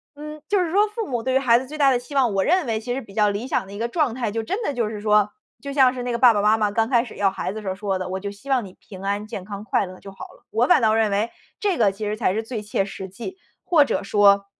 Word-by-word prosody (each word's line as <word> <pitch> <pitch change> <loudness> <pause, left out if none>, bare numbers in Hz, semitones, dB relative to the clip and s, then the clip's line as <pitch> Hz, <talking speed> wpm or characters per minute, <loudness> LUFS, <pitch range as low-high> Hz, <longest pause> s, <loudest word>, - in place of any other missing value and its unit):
嗯， 300 +1 -9
就 405 -1 +3
是 340 - -2
说 410 +3 +4
父 440 -1 -4
母 240 -3 -2
对 260 - 0
于 265 - +4
孩 235 -3 +4
子 260 - -7
最 305 - -8
大 280 -2 +5
的 255 - +3
期 250 +4 -12
望， 250 -6 +3
我 190 - +2
认 360 -1 +2
为 225 - 0
其 245 +2 -4
实 270 - -3
比 200 - -14
较 210 0 +3
理 205 +5 -3
想 230 - -1
的 195 - -13
一 205 - -7
个 235 - 0
状 285 -2 0
态 235 -3 -2
就 225 +1 -2
真 390 - -3
的 290 - -1
就 235 -4 -1
是 215 - -6
说， 210 -1 +3 0.3
就 280 - -6
像 260 -3 +5
是 250 -1 -5
那 245 - -2
个 235 - -2
爸 245 -2 +7
爸 205 - +1
妈 215 +2 +4
妈 210 -1 +1
刚 225 +2 +1
开 240 -3 +3
始 235 - -11
要 195 -1 +2
孩 190 - -4
子 220 - -6
时 205 - -9
候 190 - 0
儿 - - -10
说 195 -1 -2
的： 185 0 -5
“我 190 - -2
就 200 +1 -5
希 205 +8 -12
望 260 -3 +2
你 185 - -12
平 190 -2 -12
安 200 +1 -2
健 200 -3 -7
康 205 -1 -7
快 200 -1 0
乐 185 - -11
就 195 - -11
好 195 - -9
了。” - - -23
我 235 +3 +2
反 - - +5
倒 220 -1 +3
认 220 -1 +2
为 205 +3 0 0.3
这 395 -5 0
个 210 -4 +3
其 210 +2 -5
实 210 +1 -1
才 185 - +1
是 220 +2 -2
最 225 -1 -5
切 205 -1 -1
实 195 -1 -7
际， 240 - -8 0.3
或 330 -5 +5
者 - - -2
说， 200 0 +4
225 Hz, 360 characters per minute, -23 LUFS, 200-260 Hz, 0.3 s, 爸